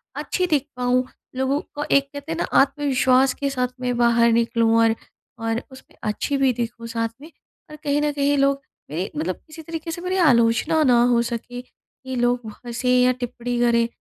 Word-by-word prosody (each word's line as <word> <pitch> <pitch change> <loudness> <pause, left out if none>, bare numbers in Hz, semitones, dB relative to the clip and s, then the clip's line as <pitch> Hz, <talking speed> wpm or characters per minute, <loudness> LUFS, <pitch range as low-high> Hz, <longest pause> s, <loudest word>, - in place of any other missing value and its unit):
अच्छी 365 - -1
दिख 290 -4 +1
पाऊँ। 250 0 +1 0.3
लोगों 265 +2 0 0.2
को 290 - -2
एक 275 - +5
कहते 285 +3 -7
हैं 325 - -2
ना - - +1 0.2
आत्मविश्वास 270 -2 +3
के 280 -1 0
साथ 250 -2 0
मैं 250 -1 -1
बाहर 235 -1 +4
निकलूँ 230 0 +2
और, 225 0 +3 0.4
और 225 +1 -1
उसमें 260 - -16
अच्छी 220 +6 -1
भी 270 -1 +3
दिखूँ 230 0 -5
साथ 230 0 -2
में 315 +3 -12 0.4
और - - -8
कहीं 290 -1 +1
न 295 0 +1
कहीं 285 0 +1
लोग 275 0 +2 0.3
मेरी 170 +6 -3
मतलब 165 +5 -2
किसी 320 +1 -10
तरीके 330 +1 -6
से 345 - -6
मेरी 365 +1 -1
आलोचना 235 +5 +3
ना 245 -4 +5
हो 235 - +4
सके, 245 +1 -5
कि 260 +1 -11
लोग 245 0 +2
व 220 - -5 0.2
हँसें 240 +1 -2
या 250 0 +5
टिप्पणी 245 -1 -4
करें, 235 -1 +3
250 Hz, 195 wpm, -22 LUFS, 235-280 Hz, 0.4 s, एक